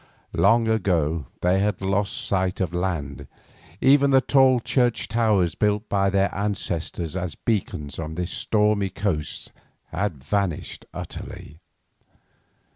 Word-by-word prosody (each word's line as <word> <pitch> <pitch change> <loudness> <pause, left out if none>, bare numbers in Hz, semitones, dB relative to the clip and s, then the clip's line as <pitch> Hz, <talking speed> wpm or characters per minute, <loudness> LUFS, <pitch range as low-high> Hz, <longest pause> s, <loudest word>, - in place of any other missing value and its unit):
Long 115 0 +4
ago 85 - +1
they 90 +2 +3
had 105 +1 0
lost 100 +1 -1
sight 95 -1 0
of 90 -3 -1
land; 75 -7 -3 0.5
even 140 +1 +5
the 135 -1 +6
tall 130 -1 +4
church 120 0 +1
towers 105 -7 +2
built 105 +1 0
by 100 -1 +2
our 100 0 +1
ancestors 90 -4 -3
as 90 -5 -3
beacons 80 -10 -2
on 80 0 -5
this 90 +1 -3
stormy 105 -2 +1
coast 90 -5 -3 0.4
had 85 -10 -3
vanished 95 +1 -2
utterly. 80 +3 -8
95 Hz, 120 wpm, -24 LUFS, 85-105 Hz, 0.5 s, the